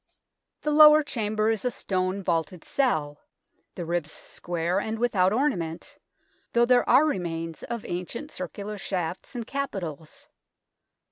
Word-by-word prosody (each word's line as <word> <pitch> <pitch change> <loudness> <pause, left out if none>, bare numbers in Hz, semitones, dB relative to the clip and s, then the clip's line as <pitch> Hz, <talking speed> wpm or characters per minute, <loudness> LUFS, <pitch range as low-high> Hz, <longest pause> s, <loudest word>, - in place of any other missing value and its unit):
The 300 - 0
lower 305 0 +8
chamber 215 -4 0
is 220 - -2
a 250 - +1
stone 190 -3 -2
vaulted 170 0 -1
cell, 155 - 0 0.6
the 175 - -5
ribs 170 -2 -2
square 175 +2 -3
and 220 +2 -3
without 200 -6 +2
ornament, 200 - -2 0.5
though 235 0 +5
there 245 0 +3
are 265 +5 +6
remains 165 - -3
of 235 -2 -5
ancient 180 - -5
circular 200 +4 -6
shafts 185 +4 -4
and 235 -2 -4
capitals. 185 - -5
195 Hz, 130 wpm, -26 LUFS, 170-240 Hz, 0.6 s, lower